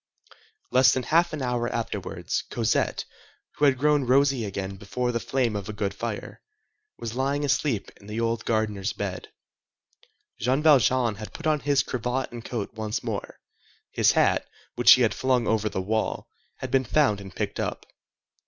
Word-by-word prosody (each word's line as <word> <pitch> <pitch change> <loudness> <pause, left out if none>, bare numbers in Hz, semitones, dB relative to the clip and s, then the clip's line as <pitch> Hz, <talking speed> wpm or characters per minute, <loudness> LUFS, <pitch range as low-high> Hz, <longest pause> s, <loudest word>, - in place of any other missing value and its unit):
Less 130 0 +6
than 130 - -1
half 170 +4 +3
an 150 -4 -4
hour 120 -1 -1
afterwards 115 -2 -3
Cosette, - - 0 0.5
who 145 - +3
had 135 -2 +4
grown 150 +1 +3
rosy 135 -2 +3
again 100 -1 -4
before 120 +5 -2
the 115 - -1
flame 120 -2 0
of 100 -1 -4
a - - -4
good 100 -1 -2
fire, - - -5 0.6
was 115 -1 -5
lying 140 +3 0
asleep 135 -6 0
in 100 - -17
the 105 +2 -4
old 115 -1 -1
gardener's 110 -2 -1
bed. 95 -3 -5 1.1
Jean 130 +6 +1
Valjean 130 -6 +4
had 110 0 -8
put 165 - -8
on 155 -1 +2
his 140 0 +2
cravat 125 +2 -2
and 120 -1 -8
coat 115 -3 -4
once 110 -1 -3
more; - - -5 0.5
his - - +3
hat, - - +2 0.3
which - - +8
he - - +4
had - - +2
flung 130 -2 +1
over 110 -1 +1
the - - -3
wall, 110 +3 -1 0.3
had - - -7
been 135 -1 +3
found 125 -5 +2
and 95 -1 -11
picked - - -3
up. - - -3
120 Hz, 170 wpm, -26 LUFS, 110-135 Hz, 1.1 s, which